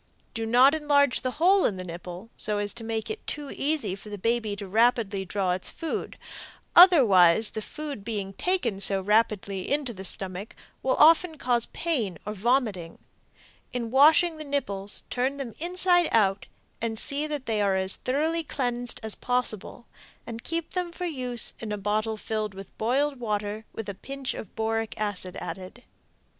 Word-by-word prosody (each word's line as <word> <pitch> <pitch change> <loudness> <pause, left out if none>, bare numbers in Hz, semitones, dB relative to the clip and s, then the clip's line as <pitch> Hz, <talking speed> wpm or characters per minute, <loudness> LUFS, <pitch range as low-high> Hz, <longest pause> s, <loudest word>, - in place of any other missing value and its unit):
Do 225 0 -3
not 250 +5 +6
enlarge 285 -4 +2
the 255 - -1
hole 375 +4 +4
in 200 - +1
the 185 - -5
nipple, 180 +4 -8
so 210 -1 -2
as 205 0 -2
to 235 - -6
make 225 - -3
it 435 - -8
too 290 -2 -3
easy 295 -8 -1
for 200 +2 -9
the 205 - -6
baby 225 0 -1
to 205 0 +1
draw 190 0 -1
its 180 +1 +1
food, 325 - -5 0.6
otherwise 220 - +7
the 220 - -4
food 290 -2 -7
being 200 -3 -4
taken 265 - -1
so 195 0 +3
rapidly 200 -1 0
into 285 -4 0
the 190 -2 -9
stomach 190 +2 -3 0.3
will 260 - +1
often 325 +1 +5
cause 245 -3 0
pain 240 - -2
or 210 - -4
vomiting. 215 -6 0 0.8
In 235 -2 -3
washing 315 +5 +5
the 310 - -6
nipples 205 -9 -2
turn 260 +3 -1
them 260 -5 -6
inside 355 0 +4
out 195 -3 +2 0.3
and 225 -1 -2
see 290 +5 -1
that 295 -3 -4
they 220 -2 0
are 200 -1 +2
as 190 0 0
thoroughly 315 +5 -1
cleaned 245 -4 -3
as 220 -1 -3
possible, 245 -2 -2 0.4
and 230 -1 -7
keep 330 0 -3
them 360 -2 -2
for 360 +1 -5
use 250 -7 -2
in 220 -2 -6
a 210 - -2
bottle 215 +2 -1
filled 215 -2 -3
with 195 -1 -11
boiled 270 +5 0
water 210 -1 -3
with 225 - -7
a 200 - -4
pinch 270 +6 -5
of 205 - -9
boric 225 0 -2
acid 195 -3 -1
added. 190 +7 -8
230 Hz, 170 wpm, -26 LUFS, 205-285 Hz, 0.8 s, otherwise